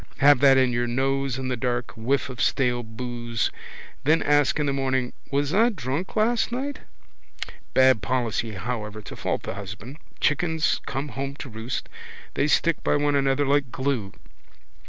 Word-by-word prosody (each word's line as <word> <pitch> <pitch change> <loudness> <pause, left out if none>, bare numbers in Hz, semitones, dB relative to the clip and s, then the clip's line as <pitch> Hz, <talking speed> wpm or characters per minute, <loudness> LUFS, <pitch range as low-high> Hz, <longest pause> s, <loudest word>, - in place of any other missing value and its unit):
Have 145 -1 +6
that 135 -1 +6
in 130 -2 +3
your 120 0 0
nose 135 +1 0
in 130 -1 -3
the 125 - 0
dark, 120 0 -2
whiff 125 +5 0
of 130 -2 -6
stale 125 -3 +2
boose. 120 -1 -3 0.5
Then 155 +3 +3
ask 145 0 +3
in 150 - +1
the 140 - 0
morning: 130 -2 0 0.2
was 145 +1 0
I 225 +4 +5
drunk 155 - -4
last 230 +2 +2
night? 275 +4 -3 1.0
Bad 130 -4 +5
policy 115 -1 -1
however 105 +1 -4
to - - -9
fault - - -2
the - - -4
husband. 105 +7 -8 0.2
Chickens 160 +1 +1
come 140 +2 -3
home 135 +3 -4
to 140 - -8
roost. 110 +2 -4 0.5
They 145 - +1
stick 165 +1 +2
by - - +2
one 145 0 +2
another 140 0 +2
like 140 -2 +1
glue. 130 -8 -2
130 Hz, 165 wpm, -25 LUFS, 120-145 Hz, 1.0 s, Have